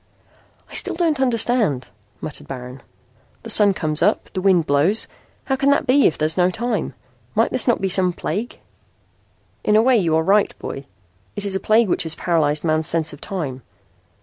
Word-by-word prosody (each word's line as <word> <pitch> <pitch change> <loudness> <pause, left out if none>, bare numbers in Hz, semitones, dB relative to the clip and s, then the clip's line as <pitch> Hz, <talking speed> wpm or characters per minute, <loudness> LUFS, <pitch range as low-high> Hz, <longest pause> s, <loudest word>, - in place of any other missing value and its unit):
"I - - -17
still - - -1
don't 325 -5 0
understand," 230 - +1 0.3
muttered 150 - -7
Baron. 125 0 -8 0.6
"The 225 - 0
sun 205 -2 +5
comes 155 -3 0
up. - - +1
The 185 - -3
wind 185 -4 +3
blows. 155 +10 +1 0.4
How 270 - -1
can 275 +1 +1
that 285 - +2
be 270 +2 +4
if - - -2
there 155 - 0
is 160 +3 +1
no 180 0 +3
time? 220 0 -3 0.4
Might 225 - +2
this 255 - 0
not 240 - +2
be 195 - 0
some 185 -1 +2
plague?" 215 +6 -5 1.0
"In 210 - +2
a 215 - +6
way 255 0 +4
you 170 -6 +1
are 160 - +2
right, 200 +3 +2
boy. 135 0 -7 0.5
It 205 - 0
is 200 - -2
a - - 0
plague 220 +3 +3
which - - 0
has 160 -1 -1
paralyzed 155 -4 0
man's 155 -1 +1
sense 165 -2 0
of 145 - -13
time. 145 -9 -5
185 Hz, 195 wpm, -20 LUFS, 155-225 Hz, 1.0 s, a